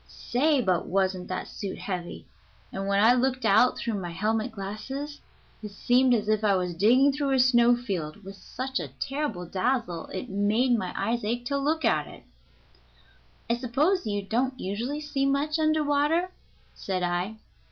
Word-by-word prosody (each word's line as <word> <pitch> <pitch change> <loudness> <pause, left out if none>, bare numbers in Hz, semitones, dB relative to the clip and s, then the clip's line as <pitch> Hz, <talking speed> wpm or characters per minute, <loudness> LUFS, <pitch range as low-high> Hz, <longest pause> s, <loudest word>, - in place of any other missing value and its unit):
Say, 280 +3 +1
but 185 -4 0
wasn't 185 -1 0
that 185 - -4
suit 200 -3 -6
heavy, 180 -3 -5 0.5
and 195 0 -3
when 200 +1 +3
I 235 +2 +7
looked 255 0 0
out 220 +4 +4
through 215 -4 -3
my 175 - -5
helmet 215 +5 -1
glasses 220 +9 -6 0.4
it 210 - -6
seemed 245 +5 +3
as 210 -2 -2
if 215 0 +1
I 200 -2 +4
was 180 -1 -1
digging 245 +10 +4
through 275 -1 -1
a - - +2
snow 245 -1 +5
field, 195 -7 -5
with 195 +1 -9
such 260 +6 -4
a - - -4
terrible 270 -10 -3
dazzle 185 -2 -1
it 185 - -6
made 215 +6 +2
my 185 -5 -2
eyes 235 0 -1
ache 240 +3 -2
to 280 +3 -1
look 305 +1 0
at 155 -10 +2
it." - - -13 1.2
"I 235 - +2
suppose 275 - +1
you 205 -1 -2
don't 255 +6 -1
usually 235 +10 -3
see 280 -2 -1
much 290 +3 0
under 310 0 +2
water?" 300 +5 +1 0.4
said 185 -2 -3
I. 175 +4 -1
230 Hz, 175 wpm, -27 LUFS, 195-270 Hz, 1.2 s, I